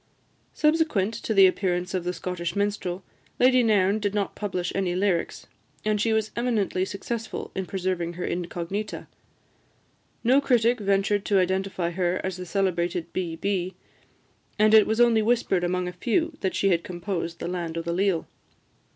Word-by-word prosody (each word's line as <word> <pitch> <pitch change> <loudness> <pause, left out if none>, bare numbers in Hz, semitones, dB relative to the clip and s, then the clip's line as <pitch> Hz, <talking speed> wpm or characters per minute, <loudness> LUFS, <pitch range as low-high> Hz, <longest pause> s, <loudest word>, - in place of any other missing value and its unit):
Subsequent 300 - +2
to 225 0 -5
the 195 -3 +7
appearance 180 -1 0
of 180 -2 -2
"The 180 - -1
Scottish 170 0 -4
Minstrel," 200 -3 -2 0.4
Lady 255 0 +5
Nairn 210 -3 +3
did 205 -1 -2
not 200 -1 -1
publish 185 -4 -3
any 185 -2 -1
lyrics; 185 -3 0 0.4
and 210 -1 +1
she 225 - +2
was 220 -1 0
eminently 220 -6 0
successful 225 +4 -5
in 190 -1 -3
preserving 180 -3 -2
her 180 +1 -4
incognita. 180 +4 -4 1.2
No 260 +4 +5
critic 245 -3 +3
ventured 200 0 +1
to 200 - +2
identify 190 -1 0
her 180 0 0
as 190 -1 -3
the 180 0 -7
celebrated 175 -3 -1
"B. 170 -3 -2
B.," 185 0 -2 0.8
and 215 +1 +4
it 220 -1 +7
was 220 +1 0
only 235 -2 +5
whispered 215 -5 +1
among 180 +1 0
a 180 - -5
few 310 - 0
that 190 - -1
she 195 - +2
had 170 -2 +2
composed 175 -1 -4
"The - - -5
Land 170 -2 -3
o' 165 - -2
the 170 - -2
Leal." 185 -2 +1
190 Hz, 165 wpm, -25 LUFS, 180-215 Hz, 1.2 s, the